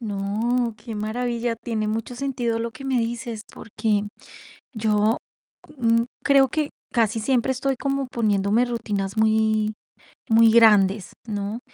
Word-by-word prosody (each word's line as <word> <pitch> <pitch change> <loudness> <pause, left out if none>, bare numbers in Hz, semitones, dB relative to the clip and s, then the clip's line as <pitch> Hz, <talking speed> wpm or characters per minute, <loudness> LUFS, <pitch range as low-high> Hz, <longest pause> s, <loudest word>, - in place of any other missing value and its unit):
No, 220 +3 -1
qué 220 +1 -8
maravilla, 235 +2 -2
tiene 220 -2 -3
mucho 225 +3 -3
sentido 245 -3 -1
lo 230 +1 -3
que 255 +3 -11
me 265 -2 +1
dices, 230 -1 -3
porque 210 -2 -1 0.7
yo, 215 0 +1 0.6
mm, 230 -2 +3 0.2
creo 275 -1 +5
que 300 +3 -2 0.2
casi 225 -1 +1
siempre 255 +2 +1
estoy 265 +1 -1
como 275 0 -2
poniéndome 215 -1 +1
rutinas 205 -5 -3
muy 220 0 +2 0.6
muy 225 0 +6
grandes, 210 -4 +4
¿no?, 205 +1 -3
230 Hz, 130 wpm, -23 LUFS, 215-245 Hz, 0.7 s, muy